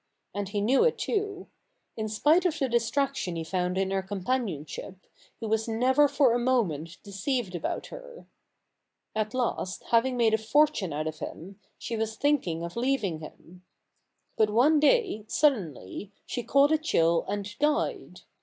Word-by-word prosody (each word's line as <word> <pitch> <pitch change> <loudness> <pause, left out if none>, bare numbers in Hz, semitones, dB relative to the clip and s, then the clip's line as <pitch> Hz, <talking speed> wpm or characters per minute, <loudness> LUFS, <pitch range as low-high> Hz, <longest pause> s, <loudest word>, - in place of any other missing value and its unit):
And 200 -1 -3
he 205 0 -2
knew 250 - +4
it 475 -1 +2
too. 405 -3 -2 0.5
In 220 -1 -3
spite 300 +11 +3
of 340 -4 0
the 270 - 0
distraction 240 -3 0
he 165 - -3
found 180 +2 -1
in 190 0 0
her 195 0 0
companionship, 190 - -3 0.4
he 230 - -5
was 220 +1 0
never 255 +6 +3
for 280 -4 +3
a 240 - +1
moment 180 - 0
deceived 200 +1 -2
about 175 - -3
her. - - -11 0.9
At 215 +3 -1
last, 235 -6 -2
having 245 +2 +3
made 230 -2 +3
a 220 - +3
fortune 225 - +2
out 150 +1 -2
of 155 -1 -5
him, 190 +5 -8 0.2
she 230 - -4
was 220 0 -2
thinking 220 - 0
of 170 0 -6
leaving 235 -9 0
him. 175 +3 -13 0.7
But 215 -1 +4
one 270 +9 +4
day, 330 - +2
suddenly, 205 - 0
she 245 - -3
caught 275 +5 +4
a 315 - +3
chill 170 - +2
and 205 +1 -4
died. 295 +1 -1
225 Hz, 160 wpm, -28 LUFS, 190-275 Hz, 0.9 s, knew